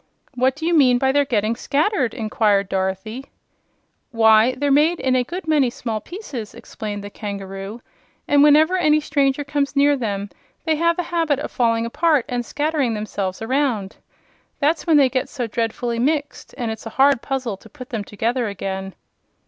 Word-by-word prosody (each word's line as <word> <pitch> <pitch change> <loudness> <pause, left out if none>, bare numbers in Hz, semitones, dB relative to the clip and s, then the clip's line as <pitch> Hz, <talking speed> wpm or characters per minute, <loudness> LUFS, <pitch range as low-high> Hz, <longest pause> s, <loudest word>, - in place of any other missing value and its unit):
"What 255 +1 +1
do 320 +2 -6
you 345 - +1
mean 255 -5 +5
by 265 +1 +2
their 285 +1 +2
getting 225 -3 0
scattered?" 280 - 0
inquired 215 -4 +1
Dorothy. 190 +7 -3 0.8
"Why, 225 +1 +4
they're 285 +2 0
made 310 +5 +3
in 260 -1 +1
a 250 - +2
good 350 +7 -7
many 295 -5 +3
small 225 -2 -4
pieces," 280 - -8
explained 205 -2 -7
the 205 - -8
kangaroo; 200 +2 -7 0.4
"and 285 -1 +4
whenever 310 +5 +5
any 305 -3 +3
stranger 285 -1 0
comes 285 0 -2
near 285 +1 +4
them 205 -5 -3 0.3
they 320 -2 +2
have 335 +2 +1
a 355 - 0
habit 325 -4 +1
of 290 - -5
falling 230 -2 +1
apart 300 +2 +1
and 245 -1 -2
scattering 290 -3 -1
themselves 205 -2 -4
around. 240 -6 -1 0.6
That's 310 +4 0
when 320 -2 +5
they 275 -2 +6
get 255 0 -2
so 250 -3 -3
dreadfully 230 +1 -2
mixed, 290 +3 -2
and 235 -4 -2
it's 220 +1 -7
a 225 - -11
hard 270 -2 +4
puzzle 255 -6 -3
to - - -17
put 255 0 -11
them 220 -4 -3
together 230 +4 -2
again." 190 -1 -5
255 Hz, 175 wpm, -21 LUFS, 220-290 Hz, 0.8 s, they